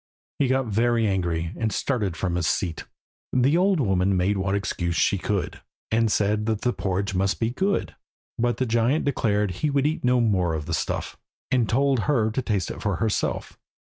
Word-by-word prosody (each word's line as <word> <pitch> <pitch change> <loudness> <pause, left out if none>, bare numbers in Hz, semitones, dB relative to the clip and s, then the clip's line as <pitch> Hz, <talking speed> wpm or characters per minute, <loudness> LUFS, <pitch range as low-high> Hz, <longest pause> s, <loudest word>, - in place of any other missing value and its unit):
He 140 - +3
got 130 0 +1
very 115 +1 +1
angry, 85 -4 -1
and 110 -1 -1
started 105 - -1
from 90 +2 -1
his 85 -1 0
seat. 85 -5 -1 0.5
The 130 +4 +3
old 185 0 +3
woman 95 -5 +2
made 95 +3 +1
what 95 0 0
excuse 85 -4 -2
she - - +2
could, - - -2 0.3
and 115 -1 +2
said 105 +1 +1
that 110 -2 0
the 125 - +1
porridge 100 +1 -2
must 95 +1 0
be 115 0 0
good; 195 +10 -1 0.4
but 120 +1 +1
the 130 - 0
giant 120 +6 +1
declared 105 -7 +1
he 90 - -1
would 140 -1 +1
eat 155 +2 -1
no 125 0 +3
more 95 -8 +1
of 75 -1 -4
the 80 - -4
stuff, - - -2 0.3
and 120 -4 +2
told 135 +1 +2
her 115 -7 +2
to 130 - -1
taste 100 - -1
it - - -8
for - - 0
herself. 110 -2 -2
110 Hz, 195 wpm, -24 LUFS, 95-125 Hz, 0.5 s, He